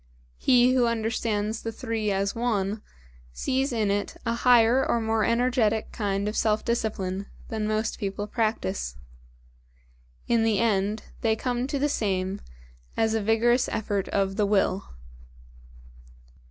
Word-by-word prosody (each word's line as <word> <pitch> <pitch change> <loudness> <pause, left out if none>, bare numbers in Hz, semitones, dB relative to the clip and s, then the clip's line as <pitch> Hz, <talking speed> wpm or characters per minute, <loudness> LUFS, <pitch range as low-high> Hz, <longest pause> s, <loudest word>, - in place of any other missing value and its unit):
He 250 0 +4
who 250 -2 +3
understands 225 -1 -1
the 225 - -4
three 225 -2 -2
as 195 0 0
one, 215 -3 -1 0.5
sees 265 - -1
in 215 -4 +1
it 205 0 -2
a 230 - +1
higher 240 +1 +5
or 235 - +1
more 220 -1 0
energetic 230 -2 +1
kind 200 -2 -1
of 210 - -3
self 215 -1 +1
discipline 200 -4 -2 0.2
than 215 -1 -2
most 215 +1 -1
people 200 0 -3
practise. 150 - -2 1.3
In 235 -1 +3
the 225 -2 +2
end 210 -1 +1 0.2
they 220 -1 +2
come 245 +2 -2
to 280 - -2
the 285 +2 +1
same 195 -6 -1 0.6
as 220 0 +2
a 225 - +1
vigorous 230 +4 +2
effort 205 -2 -2
of 195 0 -1
the 210 - +3
Will. 195 -1 +1
220 Hz, 140 wpm, -26 LUFS, 205-235 Hz, 1.3 s, higher